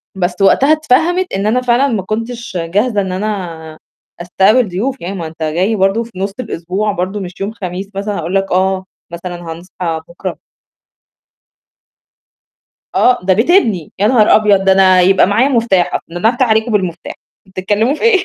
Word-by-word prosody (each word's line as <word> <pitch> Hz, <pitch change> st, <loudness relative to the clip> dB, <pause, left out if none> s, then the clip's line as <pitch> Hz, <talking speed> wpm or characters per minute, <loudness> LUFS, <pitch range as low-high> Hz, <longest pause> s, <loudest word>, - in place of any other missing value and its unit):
بس 180 Hz, -1 st, -1 dB
وقتها 270 Hz, +9 st, +4 dB
اتفهمِت 320 Hz, +5 st, +1 dB
إن 195 Hz, +1 st, -1 dB
أنا 245 Hz, +4 st, +1 dB
فعلًا 250 Hz, +2 st, +2 dB
ما 225 Hz, -7 st, -1 dB
كنتش 230 Hz, 0 st, -5 dB
جاهزة 205 Hz, +6 st, 0 dB
إن 190 Hz, -1 st, -4 dB
أنا 180 Hz, -6 st, -5 dB, 0.4 s
أستقبل 205 Hz, +7 st, +3 dB
ضيوف، 245 Hz, +10 st, -3 dB
يعني 185 Hz, +3 st, -5 dB
ما 170 Hz, -4 st, -5 dB
أنت 160 Hz, +1 st, -14 dB
جاي 175 Hz, +8 st, 0 dB
برضه 195 Hz, +3 st, +1 dB
في 235 Hz, -, -14 dB
نُص 195 Hz, 0 st, -2 dB
الأسبوع 205 Hz, -2 st, -3 dB
برضه 190 Hz, +2 st, -3 dB
مش 180 Hz, -1 st, -8 dB
يوم 200 Hz, +2 st, -2 dB
خميس 190 Hz, -2 st, -6 dB
مثلًا 200 Hz, +1 st, -3 dB
هأقول 170 Hz, +3 st, -3 dB
لك: 195 Hz, 0 st, 0 dB
"آه 190 Hz, +1 st, +1 dB, 0.3 s
مثلًا 175 Hz, +1 st, -6 dB, 0.2 s
هنصحى 170 Hz, -1 st, -5 dB
بُكره." 170 Hz, -, -6 dB, 2.6 s
آه 250 Hz, 0 st, +3 dB
ده 190 Hz, +1 st, +2 dB
بيت 225 Hz, -, +1 dB
إبني 220 Hz, -, +2 dB
يا 200 Hz, -, +2 dB
نهار 220 Hz, -2 st, +5 dB
أبيض! 205 Hz, -3 st, +3 dB
ده 195 Hz, -, +5 dB
أنا 190 Hz, -1 st, +5 dB
يبقى 190 Hz, +1 st, +4 dB
معايا 225 Hz, +7 st, +2 dB
مفتاح 230 Hz, -9 st, +1 dB
أص -, -, 0 dB
ده 165 Hz, -, -10 dB
أنا 220 Hz, -, +4 dB
افتح 250 Hz, +2 st, +1 dB
عليكم 220 Hz, +1 st, +1 dB
بالمفتاح، 185 Hz, -5 st, -2 dB, 0.3 s
بتتكلموا 205 Hz, +7 st, 0 dB
في -, -, -9 dB
إيه؟ 425 Hz, -5 st, +3 dB
195 Hz, 175 wpm, -15 LUFS, 180-230 Hz, 2.6 s, نهار